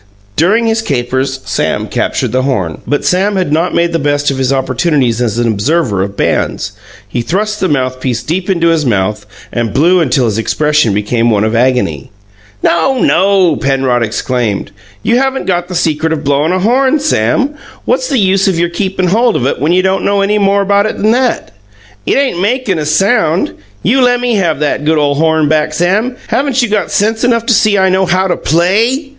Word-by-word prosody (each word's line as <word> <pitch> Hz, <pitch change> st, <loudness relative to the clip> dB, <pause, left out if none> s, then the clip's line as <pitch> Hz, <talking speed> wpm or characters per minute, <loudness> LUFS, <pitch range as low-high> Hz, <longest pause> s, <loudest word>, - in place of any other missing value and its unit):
During 210 Hz, +9 st, +2 dB
his 225 Hz, 0 st, +1 dB
capers, 130 Hz, -, -2 dB
Sam -, -, -1 dB
captured -, -, -2 dB
the 130 Hz, +2 st, +1 dB
horn. 100 Hz, -, -2 dB
But 145 Hz, -, -1 dB
Sam 195 Hz, +3 st, +1 dB
had 185 Hz, -6 st, -1 dB
not 165 Hz, +3 st, 0 dB
made 170 Hz, 0 st, +1 dB
the 165 Hz, -, 0 dB
best 145 Hz, -1 st, 0 dB
of 135 Hz, -, -4 dB
his 130 Hz, 0 st, 0 dB
opportunities 130 Hz, -2 st, 0 dB
as 115 Hz, -2 st, -1 dB
an 120 Hz, 0 st, +1 dB
observer 110 Hz, -, 0 dB
of 100 Hz, +1 st, -4 dB
bands; 100 Hz, -, -1 dB, 0.4 s
he 120 Hz, +4 st, -3 dB
thrust 210 Hz, -, -2 dB
the 190 Hz, -, 0 dB
mouthpiece 130 Hz, -3 st, -2 dB
deep 180 Hz, +7 st, -3 dB
into 170 Hz, -3 st, +2 dB
his 165 Hz, -2 st, +1 dB
mouth, 105 Hz, -3 st, -1 dB, 0.3 s
and 120 Hz, -3 st, -2 dB
blew 175 Hz, +6 st, +3 dB
until 130 Hz, -5 st, +1 dB
his 110 Hz, -1 st, -1 dB
expression 150 Hz, -3 st, +1 dB
became 115 Hz, +3 st, 0 dB
one 105 Hz, -2 st, +1 dB
of 110 Hz, +1 st, -1 dB
agony. 120 Hz, -, 0 dB, 0.5 s
"No, 170 Hz, +11 st, +2 dB
no!" 190 Hz, -7 st, +2 dB
Penrod 135 Hz, -3 st, 0 dB
exclaimed. 115 Hz, -1 st, -2 dB, 0.3 s
"You 240 Hz, -, +2 dB
haven't 265 Hz, 0 st, -1 dB
got 175 Hz, -2 st, -1 dB
the 180 Hz, -, -6 dB
secret 160 Hz, -1 st, 0 dB
of 155 Hz, -2 st, -2 dB
blowin' 145 Hz, +3 st, +1 dB
a 185 Hz, -, +1 dB
horn, 260 Hz, +7 st, +2 dB
Sam. 265 Hz, -, 0 dB, 0.3 s
What's -, -, 0 dB
the 270 Hz, -, 0 dB
use 195 Hz, -1 st, +2 dB
your 170 Hz, +1 st, +1 dB
keepin' 185 Hz, 0 st, -2 dB
hold 230 Hz, +4 st, +2 dB
of 125 Hz, -, -1 dB
it, 135 Hz, -, -1 dB
when 150 Hz, +3 st, +1 dB
you 185 Hz, +1 st, +2 dB
don't 190 Hz, 0 st, 0 dB
know 200 Hz, 0 st, +1 dB
any 210 Hz, +2 st, +1 dB
more 200 Hz, 0 st, +2 dB
about 200 Hz, +1 st, +2 dB
it -, -, -4 dB
'n 215 Hz, +2 st, +1 dB
that? 250 Hz, +1 st, 0 dB, 0.6 s
It -, -, +2 dB
ain't 260 Hz, -11 st, 0 dB
makin' 210 Hz, -4 st, 0 dB
a 150 Hz, -, -3 dB
sound! 175 Hz, 0 st, +1 dB, 0.3 s
You 255 Hz, +8 st, +2 dB
lemme 245 Hz, -1 st, +2 dB
have 170 Hz, -8 st, 0 dB
that 145 Hz, -1 st, -1 dB
good 155 Hz, +1 st, +1 dB
ole 145 Hz, -1 st, +2 dB
horn 160 Hz, +1 st, +1 dB
back, 155 Hz, 0 st, 0 dB
Sam. 205 Hz, +9 st, 0 dB
Haven't 260 Hz, +2 st, 0 dB
you 240 Hz, -, -1 dB
got 210 Hz, -1 st, -1 dB
sense 220 Hz, +3 st, 0 dB
enough 230 Hz, -2 st, +1 dB
to 240 Hz, -, +2 dB
see 210 Hz, -1 st, +3 dB
I 190 Hz, 0 st, +3 dB
know 190 Hz, 0 st, +1 dB
how 185 Hz, +2 st, +1 dB
to 175 Hz, -, 0 dB
PLAY?" 220 Hz, -, 0 dB
170 Hz, 200 wpm, -12 LUFS, 130-205 Hz, 0.6 s, blew